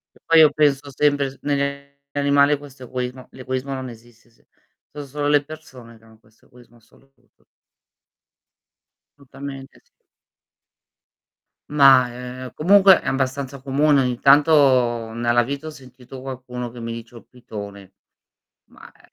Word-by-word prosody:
Che - - -24
poi 165 0 +5
io 155 -2 +6
penso 145 -1 0
sempre 145 -1 +1
s 135 - -19
negli 140 -1 -3 0.2
animali 140 0 +2
questo 140 -2 -13
egoismo 125 +1 -6
l'egoismo 130 +1 -5
non 130 -1 -6
esiste 120 0 -17
se 115 - -32 0.5
so' 145 -1 -8
solo 145 +2 -4
le 145 0 +3
persone 130 -7 -13
che 110 - -27
hanno 110 -1 -21
questo 110 0 -29
egoismo 120 -1 -21
assoluto. 135 +4 -29 1.7
Tutamente 135 -1 -11
sì. - - -43 1.7
Ma, 135 -4 +5
ehm, 125 +1 -9
comunque, 190 +3 +5
è - - -10
abbastanza 135 0 -3
comune. 140 +1 +2
Ogni 125 -2 -2
tanto, 130 -6 +3
nella 120 +1 +1
vita 140 +5 -6
ho - - -4
sentito 130 -2 -13
qualcuno 125 -2 -7
che 120 0 -11
mi 115 0 -5
dice: 115 +1 -10
"Ho - - -10
il - - -23
pitone". 100 -5 -10 0.7
Ma, - - -17
eh - - -26
130 Hz, 145 wpm, -21 LUFS, 120-140 Hz, 1.7 s, io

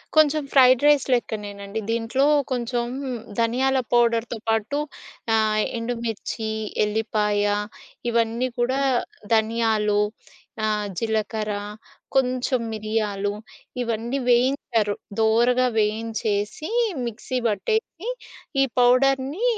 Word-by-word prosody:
కొంచెం 310 -1 +4
fried 255 -1 +6
rice 290 -3 +5
లెక్కనేనండి. 205 -3 -3
దీంట్లో 230 +4 +1 0.3
కొంచెం 240 -1 -1 0.5
ధనియాల 255 +4 +2 0.2
పౌడర్‌తో 235 -1 +2
పాటు 225 +5 0 0.6
ఆహ్ 215 -1 +2 0.2
ఎండుమిర్చి, 230 -2 -3 0.4
ఎల్లిపాయ 210 -1 0 0.7
ఇవన్నీ 230 +2 +1
కూడా 255 +3 +1 0.5
ధనియాలు 220 -2 +2 0.6
ఆహ్, 210 -1 0
జీలకర్ర 220 0 -1 0.6
కొంచెం 255 0 +1
మిరియాలు 215 -2 -1 0.5
ఇవన్నీ 235 +2 -2
వేయించారు. 240 -4 +2 0.3
దోరగా 240 +3 +3
వేయించేసి, 220 - -1 0.4
మిక్సీ 240 +2 -4
బట్టేసి, 385 - -2 0.5
ఈ - - +6 0.2
పౌడర్‌ని, 270 - +3
230 Hz, 85 wpm, -24 LUFS, 215-255 Hz, 0.7 s, fried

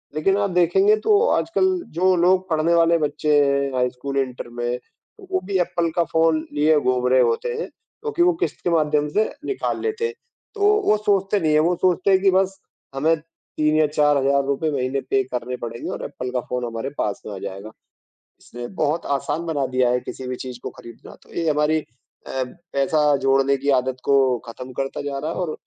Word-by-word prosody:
लेकिन 195 +6 +2
आप 205 -1 +1
देखेंगे 180 +4 +4
तो 420 -1 +5
आजकल 330 +3 +1 0.3
जो 185 +3 +3
लोग 185 +2 +2
पढ़ने 160 +1 +2
वाले 170 0 +4
बच्चे 150 -1 0
हैं, 140 0 +1
हाई 125 0 +2
स्कूल, 135 +2 -5
इन्टर 130 -2 -4
में, 120 +1 -3
तो 380 - -21
वो 375 0 +1
भी 200 -1 0
एप्पल 170 -1 0
का 170 - +3
फ़ोन 160 -1 +2
लिए 150 +1 +3
घूम 125 -2 +1
रहे 130 0 +4
होते 120 - 0
हैं, 460 - -4
क्योंकि 445 -6 -6
वो 360 0 +4
किश्त - - -3
के - - +1
माध्यम 150 -3 +2
से 220 - +4 0.2
निकाल 405 - -2
लेते 445 +1 -1
हैं, 460 - -2 0.4
तो 415 0 +4
वो 215 - +4
सोचते 200 -1 +1
नहीं 155 -3 +1
है। 150 - +5
वो 170 +3 +2
सोचते 185 +1 +2
हैं 190 - +5
कि 195 -1 +4
बस 190 +1 +1 0.4
हमें 155 +4 +3 0.4
3 155 0 +2
या 155 -1 +4
4000 145 -1 +2
हज़ार 140 +1 +2
रुपए 140 +3 0
महीने 135 0 -1
पे 135 - +2
करने 125 0 -4
पड़ेंगे 115 0 -6
और - - -5
एप्पल 125 - -6
का 125 -1 -1
फ़ोन 125 -1 -2
हमारे 115 +3 -4
पास 105 - -2
में 105 - -6
आ - - -6
जाएगा। 100 +2 -7 0.7
इसने 120 0 -8 0.2
बहुत 155 +2 0
आसान 150 +4 -3
बना 145 -5 -1
दिया 125 -1 +3
है 125 0 +1
किसी 130 +1 -8
भी 125 - -3
चीज़ 125 -1 -7
को - - -5
खरीदना, 115 -1 -13
तो - - -18
ये 165 -2 0
हमारी 150 +1 +1 0.4
अ, 130 - -2 0.3
पैसा 145 +3 +1 0.2
जोड़ने 135 0 +2
की 140 +1 -5
आदत 130 0 -1
को 140 - +4 0.3
खत्म 125 +3 -8
करता 135 0 -3
जा 140 -1 -4
रहा 155 +3 -3
है - - -5
और 175 -4 -2
150 Hz, 210 wpm, -22 LUFS, 130-180 Hz, 0.7 s, तो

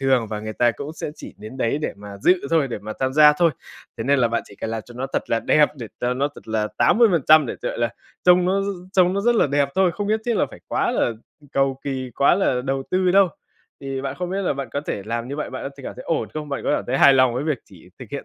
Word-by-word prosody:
thường 130 -4 +2
và 105 -1 -3
người 110 0 -5
ta 120 +2 +3
cũng 140 +5 -7
sẽ 160 - -5
chỉ - - -10
đến 110 +5 -9
đấy 130 +2 0
để 150 - -3
mà 100 0 -10
dự 180 - +3
thôi, 160 -4 +2
để 120 - -4
mà 105 +2 -7
tham 130 0 0
gia 150 0 +7
thôi. 170 +2 +3 0.5
Thế - - -3
nên 140 +1 +3
là 120 -2 +3
bạn 115 0 -1
chỉ - - -14
cần 110 - -4
làm 115 -1 -3
cho 120 - -13
nó 130 +2 -3
thật - - -2
là 115 - +2
đẹp, 150 +4 +4
để 120 -4 -7
cho 125 +1 0
nó 140 +3 0
thật - - -14
là 110 -1 0
80% 165 - +5
để, - - -5
gọi - - -3
là, 120 0 +1 0.4
trông 180 0 +6
nó 195 +2 +1 0.3
trông 185 -2 +4
nó 200 - 0
rất 240 +3 +3
là 225 - +3
đẹp 140 0 +1
thôi, 190 -2 +3
không 205 -1 -3
nhất 220 +1 +1
thiết 240 - +1
là - - +2
phải - - -13
quá - - 0
là - - +1 0.4
cầu 135 -1 +1
kỳ, 130 -2 -3
quá 140 - +5
là 155 -9 +1
đầu 135 0 -1
tư 185 0 +2
đâu. 195 0 +5 0.5
Thì 135 -1 -4
bạn 135 -1 -3
không 180 0 -3
biết 195 +1 -2
là 185 - +1
bạn 135 -2 -5
có 145 - -1
thể 100 - -3
làm 115 +2 -3
như 140 - -5
vậy, 150 - -4
bạn 130 - -6
có 135 - -4
thể - - -10
cảm - - -6
thấy 130 - -9
ổn 165 - -1
không? 155 -1 -5
Bạn 140 - -3
có - - +1
cảm - - -4
thấy 135 - 0
hài 140 - +7
lòng 130 -2 +4
với 130 +4 -2
việc 155 -5 0
chỉ 90 -2 -17
thực 125 - -9
hiện 140 - -5
135 Hz, 295 wpm, -22 LUFS, 120-165 Hz, 0.5 s, gia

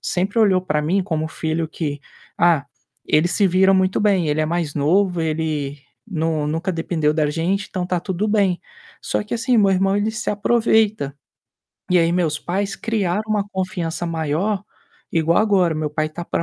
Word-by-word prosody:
sempre 195 +5 -1
olhou 195 -4 +4
pra 150 -4 0
mim 185 +6 +1
como 160 -4 -2
o - - -4
filho 160 0 -2
que: 150 -3 -4 0.4
"Ah, 170 -4 +3 0.4
ele 155 +3 +3
se 200 +1 +3
vira 190 +2 +4
muito 185 0 +2
bem, 195 -6 +2
ele 150 +1 +1
é 155 - +1
mais 170 -2 -1
novo, 175 +4 +2
ele 155 -3 -2 0.3
nu 160 -4 -1
nunca 165 +5 -1
dependeu 165 -2 0
da 155 -1 +1
gente, 185 +6 -1
então 185 -3 -3
tá 180 -1 0
tudo 190 +3 -2
bem." 200 -4 +2 0.4
Só - - -1
que, 210 - -4
assim, 235 +1 +1
meu 200 -2 +4
irmão, 195 +1 +2
ele 210 +2 0
se 215 - -2
aproveita. 215 -7 +1 0.8
E 180 - +5
aí 165 0 +2
meus 160 -4 0
pais 195 +3 -2
criaram 210 -3 -1
uma 210 -2 +1
confiança 175 -3 -3
maior 165 +6 -1 0.5
igual 165 0 +2
agora, 190 -6 +3
meu 155 -1 -2
pai 155 +1 -1
tá 170 +3 -7
pra - - -2
175 Hz, 185 wpm, -21 LUFS, 160-195 Hz, 0.8 s, E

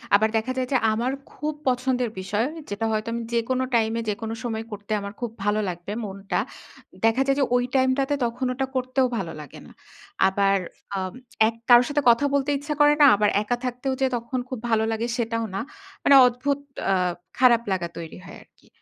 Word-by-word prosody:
আবার 215 +2 +3
দেখা 225 +4 -1
যায় 255 - 0
যে, 265 - +4 0.2
আমার 235 +4 0 0.2
খুব 305 +1 -3
পছন্দের 250 -1 +1
বিষয়, 205 +4 -1 0.2
যেটা 205 +2 -2
হয়তো 215 0 -1
আমি 235 0 -3
যেকোনো 255 +2 0
টাইম 220 -1 +2
এ - - -1
যেকোনো 220 +2 -3
সময় 225 -2 -3
করতে 205 +1 -8
আমার 200 0 -6
খুব 240 -3 -3
ভালো 205 +1 +1
লাগবে 175 +3 -6
মনটা। 195 0 -3 0.7
দেখা 225 +4 +3
যায় 275 0 +2
যে - - +4
ওই 245 - +3
টাইম 260 0 +4
টাতে, 275 +1 0
তখন 240 +2 -3
ওটা 265 +1 -1
করতেও 255 0 +1
ভালো 180 -5 -3
লাগে 145 - -11
না। - - -15 0.6
আবার 195 0 +2 0.4
আম 185 -1 -3 0.3
এক 225 - -3
কারো 240 0 +9
সাথে 290 0 +1
কথা 235 +5 +4
বলতে 280 0 +1
ইচ্ছা 295 +2 -4
করে 295 0 +7
না। - - +9
আবার 210 0 +2
একা 245 +3 -1
থাকতেও 250 +2 -2
যে - - +4
তখন 235 +2 -3
খুব 255 -4 -4
ভালো 220 -1 +3
লাগে 225 +1 -1
সেটাও 230 -1 -1
না। 195 - -1 0.4
মানে 280 - +6
অদ্ভুত 270 +3 -1 0.3
আ - - +4 0.5
খারাপ 245 -2 +6
লাগা 180 -2 -1
তৈরি 165 -1 -7
হয় - - -10
আরকি। - - -29
235 Hz, 200 wpm, -24 LUFS, 210-255 Hz, 0.7 s, কারো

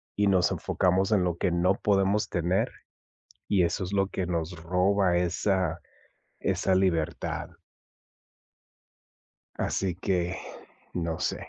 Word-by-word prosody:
y 105 0 +2
nos 95 -2 +3
enfocamos 95 +2 +1
en 100 -4 +4
lo 90 -2 -1
que 90 - 0
no 90 +3 +2
podemos 100 +1 +1
tener. 90 +2 +1 0.8
Y 100 -3 +3
eso 85 +2 -1
es 90 - -6
lo 95 -1 +2
que 95 -2 -3
nos 85 0 -3
roba 90 +1 +2
esa 90 -1 0 0.6
esa 95 - +1
libertad. 90 -5 0 2.1
Así 95 -2 -1
que, 90 0 -1 0.6
no 85 -2 -2
sé. - - -2
90 Hz, 120 wpm, -28 LUFS, 85-95 Hz, 2.1 s, en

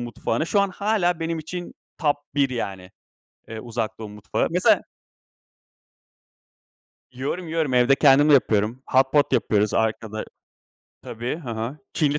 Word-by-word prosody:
mutfağına. 120 +3 -2
Şu 200 +4 +2
an 200 - +2
hâlâ 185 -4 0
benim 165 0 -2
için 175 +3 -7 0.2
top 145 -2 +2 0.2
1 140 -2 +2
yani, 95 -6 -5 0.6
eee, 110 0 -7
Uzak 115 -2 -4
Doğu 110 -2 -7
mutfağı. 105 0 -2
Mesela 180 +2 +4 2.3
Yiyorum, 140 +8 -4
yiyorum. 160 -5 -1
Evde 125 +2 +4
kendim 145 +1 +5
de - - +7
yapıyorum. 115 0 +2
Hot 130 0 +3
pot 145 -1 +3
yapıyoruz 105 -1 +1
arkada 110 -1 -1 0.8
Tabii, 120 +4 -4
hı 130 -8 -7
hı. 115 +6 -4
Çinli, 150 -2 +1
130 Hz, 140 wpm, -23 LUFS, 110-160 Hz, 2.3 s, de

